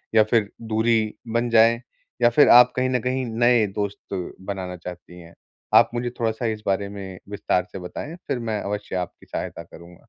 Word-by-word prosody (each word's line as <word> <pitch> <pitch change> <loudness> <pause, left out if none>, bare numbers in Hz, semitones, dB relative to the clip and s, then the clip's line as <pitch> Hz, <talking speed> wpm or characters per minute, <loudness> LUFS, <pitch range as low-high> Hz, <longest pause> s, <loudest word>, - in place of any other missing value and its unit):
या 110 - +7
फिर 110 -4 +3
दूरी 110 -1 +1 0.2
बन 120 +1 +1
जाए 115 +1 +5 0.4
या - - +6
फिर 145 +5 +5
आप 125 +1 +8
कहीं 130 0 +1
न 125 -1 +1
कहीं 130 +1 -1
नए 120 0 +3
दोस्त 100 0 -5 0.3
बनाना 95 -2 -4
चाहती 90 0 -10
हैं? 85 -1 -14 0.4
आप - - +7
मुझे 120 0 -2
थोड़ा-सा 115 +1 -1
इस 110 -2 -2
बारे 100 0 0
में 95 -2 -8
विस्तार 100 -3 0
से - - -7
बताएँ, 120 - -7
फिर 125 - -1
मैं 110 -3 -3
अवश्य 105 -1 -4
आपकी 90 -1 -5
सहायता - - -5
करूँ। 85 +1 -14
110 Hz, 185 wpm, -23 LUFS, 95-120 Hz, 0.4 s, आप